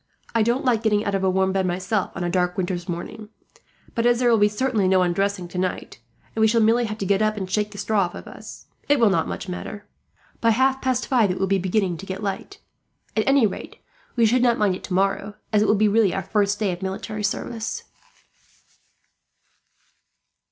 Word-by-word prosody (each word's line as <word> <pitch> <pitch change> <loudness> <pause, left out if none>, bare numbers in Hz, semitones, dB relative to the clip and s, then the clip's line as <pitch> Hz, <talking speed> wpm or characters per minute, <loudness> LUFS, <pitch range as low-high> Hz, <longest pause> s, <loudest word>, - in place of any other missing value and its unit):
I 230 - +3
don't 240 +5 +1
like 235 -4 +2
getting 210 -2 +1
out 200 - -1
of 195 -1 0
a 190 - +3
warm 190 0 +2
bed, 190 -1 0
myself, 185 +3 -1
on 185 - -3
a 175 - -1
dark 180 -1 0
winter's 180 -1 -2
morning; 210 +5 -6 0.6
but 235 0 +1
as 240 0 +4
there 245 -1 +3
will 225 - +4
be 205 - +5
certainly 210 -2 0
no 185 -1 +4
undressing 185 +1 -1
tonight, 180 -7 -4 0.4
and 220 - 0
we 220 - +6
shall 230 +1 +3
merely 230 +2 +3
have 215 -1 -4
to 195 - -3
get 195 +2 +2
up 215 0 +1
and 190 -2 -3
shake 210 +2 0
the 205 - -12
straw 205 +1 +1
off - - -12
us, - - -10 0.2
it 290 -1 +4
will 225 -4 +5
not 165 -3 +1 0.2
matter 180 0 -5
much. - - -37
By 230 - +4
half 265 +4 +2
past 255 -1 0
five 235 -6 +3
it 180 - -1
will 195 - +1
be 195 0 +1
beginning 185 -1 0
to 195 - -10
get 190 +2 -5
light. 205 - -4 0.6
At 215 - 0
any 275 -3 +5
rate, 200 - -5 0.4
we 235 -2 +4
should 240 +3 +3
not 240 -2 +3
mind 205 -3 +2
it 185 - -7
tomorrow, 195 +2 -1 0.2
as 210 - +4
it 215 - +2
will 210 - +4
be 215 +1 +3
really 210 -2 +3
our 195 - -2
first 205 +1 +1
day 205 -3 0
of 175 +1 -6
military 210 +3 -4
service." 225 +2 -3
205 Hz, 215 wpm, -23 LUFS, 190-225 Hz, 0.6 s, we